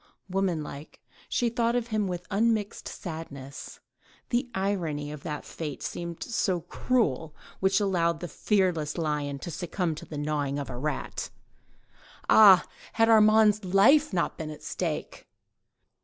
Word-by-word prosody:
Woman 185 -4 0
like, 145 +1 -10 0.3
she 240 - +1
thought 235 0 0
of 240 -1 -1
him 215 -2 0
with 180 -1 -4
unmixed 215 0 0
sadness; 145 -6 -8 0.5
the 245 +1 0
irony 170 -7 -1
of 150 -2 -8
that 150 -2 -5
fate 150 -5 -6
seemed 170 -1 -5
so 190 -7 0
cruel 165 - -1 0.2
which 190 +1 +3
allowed 170 -5 +1
the 175 - -5
fearless 175 -5 0
lion 150 -3 -1
to 170 +5 -7
succumb 175 +1 -2
to 155 - -9
the 150 - -7
gnawing 145 -1 -1
of 140 -2 -4
a - - -6
rat! 145 0 -3 1.0
Ah! 195 -4 +8 0.3
had 225 0 +3
Armand's 215 -1 +5
life 235 +12 +5
not 175 -3 -1
been 160 -1 -4
at 150 - -9
stake! - - -4
175 Hz, 140 wpm, -27 LUFS, 150-210 Hz, 1.0 s, Ah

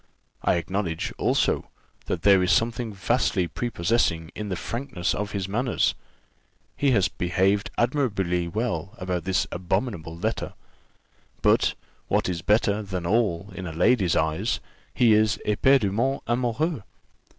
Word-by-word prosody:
I - - +2
acknowledge, 85 -1 -2
also, - - +1 0.4
that - - -2
there 100 -2 +6
is 90 0 +2
something 115 +4 +1
vastly 100 -2 +1
prepossessing 85 -4 0
in 105 -1 -5
the 95 - -1
frankness 115 -3 -3
of 105 +1 -3
his 95 -2 -2
manners; 120 +5 +1 0.8
he 140 - +2
has 105 -8 +3
behaved 95 +3 0
admirably 100 -10 0
well 100 -1 -3
about 90 -2 -3
this 95 0 +1
abominable 90 -2 -2
letter; - - -2 0.9
but, - - +3 0.3
what - - +1
is 90 -2 -2
better 105 +2 +2
than 95 -4 -4
all 100 -2 0
in 95 -1 -6
a 80 - -6
lady's 95 +1 +3
eyes 80 +8 0 0.3
he 115 -3 +4
is 110 +1 +3
éperdument 120 +2 +2
amoureux." 125 +5 0
100 Hz, 130 wpm, -25 LUFS, 90-115 Hz, 0.9 s, there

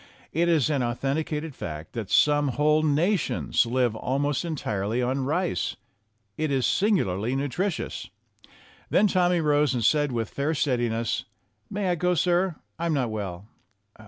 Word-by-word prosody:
It 170 +2 +2
is 155 -3 +3
an 140 -3 +1
authenticated 145 +5 -2
fact 75 -9 -7
that 115 -5 -5
some 145 -1 +4
whole 150 +4 +2
nations 155 - +1
live 120 -2 +1
almost 140 +6 -1
entirely 115 - -2
on 130 +2 0
rice. 155 - -1 0.6
It 155 0 0
is 130 -3 +1
singularly 125 - +1
nutritious. 160 +7 -2 0.8
Then - - +4
Tommy 180 -3 +2
rose 150 -2 +2
and 115 -3 0
said 145 -2 +3
with 115 -3 -2
fair 150 +3 -1
steadiness: 120 -5 0 0.4
"May 200 -2 -1
I - - +3
go, 180 +1 +1
sir? 175 +1 +2 0.2
I'm 165 -2 0
not 125 -5 0
well." 100 -3 -5
145 Hz, 140 wpm, -26 LUFS, 120-165 Hz, 0.8 s, some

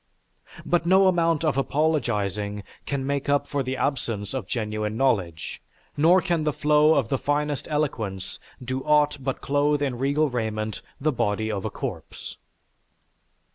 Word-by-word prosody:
But 170 -1 +1
no 190 +1 +6
amount 165 -3 +2
of 140 -4 +2
apologizing 105 - 0 0.2
can 140 -2 -2
make 140 0 -1
up 145 0 +2
for 145 - -1
the 130 0 -3
absence 115 -9 -2
of 130 -8 -3
genuine 110 -1 -2
knowledge, 95 -12 0 0.3
nor 170 +5 +5
can 170 -4 0
the 150 - +1
flow 150 +1 +4
of 135 -6 +1
the 135 - 0
finest 145 -2 -1
eloquence 115 -11 -2 0.3
do 130 +1 -2
aught 150 -1 +3
but 135 0 -2
clothe 145 +1 +1
in 130 -4 -2
regal 140 +3 +2
raiment 110 -4 -3 0.2
the 155 +3 +1
body 110 -3 0
of 100 -2 -3
a - - 0
corpse." - - -6
135 Hz, 150 wpm, -25 LUFS, 110-150 Hz, 0.3 s, no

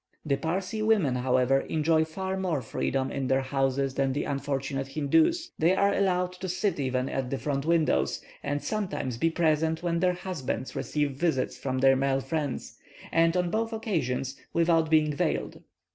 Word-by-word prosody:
The 140 -2 +2
Parsee 185 +7 -2
women, 210 - +3
however, 130 +1 +2
enjoy 160 +2 +1
far 190 +4 -4
more 180 -8 -1
freedom 130 +4 -1
in 135 -2 -2
their 135 +1 +2
houses 135 0 0
than 135 -1 0
the 145 - -1
unfortunate 135 -1 -2
Hindoos: 165 - +2
they 170 +4 +4
are 200 +1 +3
allowed 180 -2 +1
to 190 - -3
sit 185 -1 -1
even 130 -1 0
at 135 -2 -2
the 135 - -2
front 140 +1 -2
windows, 155 - +2 0.2
and 145 0 -2
sometimes 185 - -3
be 165 - +3
present 160 0 +1
when 170 -1 0
their 180 +1 +3
husbands 170 -8 -4
receive 145 -1 -1
visits 135 -1 0
from 130 -1 -3
their 135 +1 +5
male 135 0 +1
friends, 145 -2 -4 0.3
and 165 +1 +3
on 180 -1 0
both 225 +1 -1
occasions 140 - -2 0.2
without 165 -1 +3
being 155 -1 +3
veiled. 140 - -2
155 Hz, 170 wpm, -28 LUFS, 135-175 Hz, 0.3 s, their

